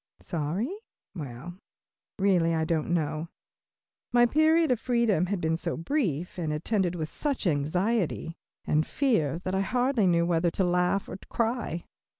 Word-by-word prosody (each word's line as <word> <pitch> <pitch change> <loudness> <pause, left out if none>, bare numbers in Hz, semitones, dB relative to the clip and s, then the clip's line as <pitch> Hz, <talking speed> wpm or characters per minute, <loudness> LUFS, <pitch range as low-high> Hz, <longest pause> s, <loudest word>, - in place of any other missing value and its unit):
Sorry? 175 - -2 0.4
Well, 155 +3 -8 0.6
really 180 -4 +3
I 160 0 +1
don't 160 -2 -1
know. 155 -1 -1 0.8
My 240 0 +6
period 315 +3 +3
of 245 - +2
freedom 235 -9 +2
had 200 0 -1
been 160 0 0
so 170 0 -3
brief, 180 - -1
and 160 -3 -1
attended 180 +3 0
with 160 -2 -3
such 280 - -2
anxiety 170 +3 0 0.3
and 155 +1 +2
fear, 165 - +1
that 185 - -2
I 190 - +2
hardly 245 0 +1
knew 170 -1 +3
whether 170 0 +2
to 190 - -1
laugh 180 +2 +1
or - - -6
cry. 230 -7 -1
180 Hz, 150 wpm, -28 LUFS, 160-230 Hz, 0.8 s, My